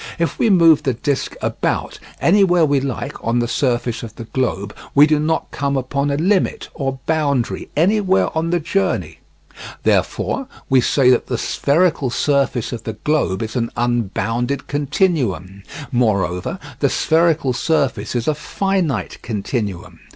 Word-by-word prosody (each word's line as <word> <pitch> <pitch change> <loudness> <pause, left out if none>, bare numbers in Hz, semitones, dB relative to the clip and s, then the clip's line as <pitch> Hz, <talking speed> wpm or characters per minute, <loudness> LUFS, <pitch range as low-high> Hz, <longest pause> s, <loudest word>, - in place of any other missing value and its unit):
If 170 -1 -2
we 230 - +3
move 165 -5 +6
the 130 -3 -1
disc 140 +3 -2
about, - - -2 0.2
anywhere 180 -2 +4
we 145 -2 +2
like, 135 -2 -5
on 115 +1 0
the 120 0 +1
surface 120 -2 -1
of 115 -2 -9
the 115 - -7
globe, 110 -4 -2 0.2
we 145 +1 +8
do 155 -1 +2
not 160 +2 -1
come 140 0 -1
upon 140 +2 -1
a 140 - 0
limit 185 +4 0
or 135 -3 -3
boundary 145 -6 0
anywhere 190 +1 +2
on 165 +1 0
the 175 0 +1
journey. 185 +5 -1 0.6
Therefore 270 - 0 0.2
we 130 -1 +5
say 130 0 +4
that 125 - +2
the 125 - -1
spherical 145 +1 +1
surface 135 -2 0
of 115 - -5
the 110 - -4
globe 115 -5 0
is 110 +2 -6
an 115 -2 0
unbounded 120 +3 -1
continuum. 130 - -1 0.3
Moreover, 100 -7 0 0.2
the - - +2
spherical 160 -5 +2
surface 140 -1 0
is 120 -1 -1
a 155 - +3
finite 170 - -2
continuum. 105 -4 -4
140 Hz, 150 wpm, -19 LUFS, 120-160 Hz, 0.6 s, we